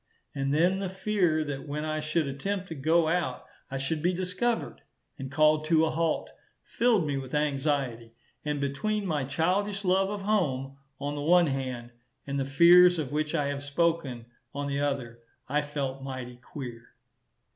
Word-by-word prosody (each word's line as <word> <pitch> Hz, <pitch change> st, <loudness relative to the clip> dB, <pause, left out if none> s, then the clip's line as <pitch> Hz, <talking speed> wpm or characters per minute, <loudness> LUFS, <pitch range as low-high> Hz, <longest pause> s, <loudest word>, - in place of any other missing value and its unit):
And 135 Hz, 0 st, -1 dB
then 175 Hz, +6 st, +3 dB
the 195 Hz, -2 st, -2 dB
fear 190 Hz, -5 st, +1 dB
that 145 Hz, -1 st, -5 dB
when 150 Hz, +2 st, -3 dB
I 155 Hz, 0 st, -1 dB
should 155 Hz, +1 st, 0 dB
attempt 185 Hz, +8 st, -3 dB
to -, -, -4 dB
go 160 Hz, +3 st, +2 dB
out, 160 Hz, -6 st, -1 dB, 0.2 s
I 135 Hz, -, -3 dB
should 140 Hz, +4 st, -2 dB
be 175 Hz, +3 st, +2 dB
discovered 185 Hz, +6 st, -1 dB, 0.4 s
and 135 Hz, 0 st, -6 dB
called 155 Hz, +1 st, +4 dB
to 160 Hz, 0 st, +4 dB
a 160 Hz, -, 0 dB
halt, 165 Hz, 0 st, -1 dB, 0.3 s
filled 230 Hz, -8 st, +2 dB
me 145 Hz, -2 st, -1 dB
with 135 Hz, +1 st, -5 dB
anxiety; 140 Hz, -6 st, -1 dB, 0.3 s
and 150 Hz, -1 st, -2 dB
between 200 Hz, +10 st, -1 dB
my 150 Hz, -6 st, -1 dB
childish 195 Hz, +8 st, 0 dB
love 190 Hz, +1 st, +3 dB
of 205 Hz, -1 st, -4 dB
home, 135 Hz, -11 st, 0 dB, 0.2 s
on 145 Hz, +1 st, -3 dB
the 145 Hz, -, -4 dB
one 175 Hz, +3 st, +5 dB
hand, 130 Hz, -4 st, -3 dB, 0.3 s
and 140 Hz, 0 st, -2 dB
the 135 Hz, -, 0 dB
fears 175 Hz, +5 st, +7 dB
of 150 Hz, -5 st, -3 dB
which 155 Hz, +2 st, -1 dB
I 145 Hz, -3 st, +1 dB
have 140 Hz, 0 st, -3 dB
spoken, 145 Hz, -5 st, 0 dB, 0.3 s
on 145 Hz, 0 st, -2 dB
the 140 Hz, 0 st, -1 dB
other, 130 Hz, -5 st, -2 dB, 0.3 s
I 145 Hz, +3 st, +1 dB
felt 140 Hz, -2 st, -4 dB
mighty 130 Hz, -2 st, -6 dB
queer. 120 Hz, -2 st, -9 dB
150 Hz, 175 wpm, -28 LUFS, 135-175 Hz, 0.4 s, fears